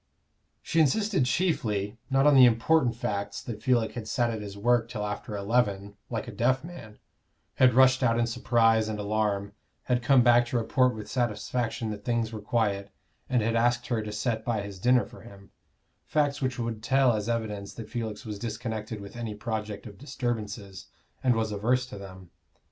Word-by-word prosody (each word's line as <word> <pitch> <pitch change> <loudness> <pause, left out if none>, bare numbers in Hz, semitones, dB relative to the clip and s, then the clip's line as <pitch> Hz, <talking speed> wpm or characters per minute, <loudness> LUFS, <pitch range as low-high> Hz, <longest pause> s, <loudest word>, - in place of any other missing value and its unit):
She 165 - 0
insisted 190 +1 +2
chiefly, 115 - 0
not 135 +1 +3
on 150 - +6
the 130 -2 +9
important 120 +2 +2
facts 100 -3 -3
that 110 -3 -6
Felix 120 -2 +1
had 115 -3 -6
sat 120 +1 +1
at 110 -2 -4
his 100 -1 -8
work 120 +2 +2
till 105 -4 -4
after 105 +1 -5
eleven, 100 -2 0
like 115 -1 -3
a - - -6
deaf 125 +5 +1
man, 160 -11 -10 0.6
had 125 -2 +5
rushed 130 0 +6
out 115 -2 +3
in 120 - +2
surprise 115 -2 +2
and 110 - -3
alarm, 105 -1 -1 0.3
had 125 -1 0
come 130 0 +5
back 120 0 +5
to 120 - -1
report 125 +2 +2
with 105 -1 -7
satisfaction 120 0 -2
that 105 -1 -7
things 115 -1 -1
were 110 - -6
quiet, 105 -3 0 0.4
and 125 -3 +2
had 115 +1 0
asked 120 +1 +2
her 120 -3 0
to 105 0 -5
set 110 +1 -2
by 110 -4 -1
his 100 -2 -8
dinner 125 +4 +3
for 120 - -14
him 100 -3 -14 0.6
facts 145 -1 +1
which 130 -1 -1
would 115 -2 -3
tell 130 +1 +3
as 105 +1 -2
evidence 105 -4 -3
that 115 -2 -7
Felix 115 -1 -4
was 105 -2 -6
disconnected 110 -1 -4
with 100 +2 -10
any 115 -3 -5
project 105 -2 -4
of 100 -3 -11
disturbances, 110 -7 -4 0.4
and 125 -2 +3
was 110 -1 -1
averse 120 +5 +1
to 115 - -9
them. 95 -2 -11
115 Hz, 190 wpm, -27 LUFS, 105-125 Hz, 0.6 s, the